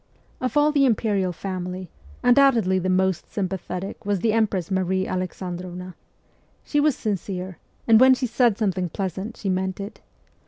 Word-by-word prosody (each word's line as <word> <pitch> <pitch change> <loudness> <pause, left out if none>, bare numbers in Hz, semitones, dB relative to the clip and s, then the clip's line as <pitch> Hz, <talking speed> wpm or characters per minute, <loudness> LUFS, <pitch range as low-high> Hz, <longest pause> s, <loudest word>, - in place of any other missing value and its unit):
Of 255 +3 -1
all 295 +1 +5
the 280 -2 +4
imperial 205 -5 +1
family, 180 -1 -5 0.3
undoubtedly 240 -8 +4
the 185 +1 -1
most 185 -1 +1
sympathetic 190 -1 -4
was 205 -1 0
the 220 0 +2
empress 205 -5 0
Marie 190 0 0
Alexandrovna. 180 0 -5 0.7
She 295 - 0
was 295 -2 +3
sincere, 190 -3 -4 0.3
and 225 -1 +7
when 260 +1 +7
she 255 - -2
said 235 -2 +2
something 185 -5 0
pleasant 190 +5 -4
she 205 - -5
meant 185 0 -1
it. 200 +2 -7
190 Hz, 150 wpm, -24 LUFS, 185-225 Hz, 0.7 s, and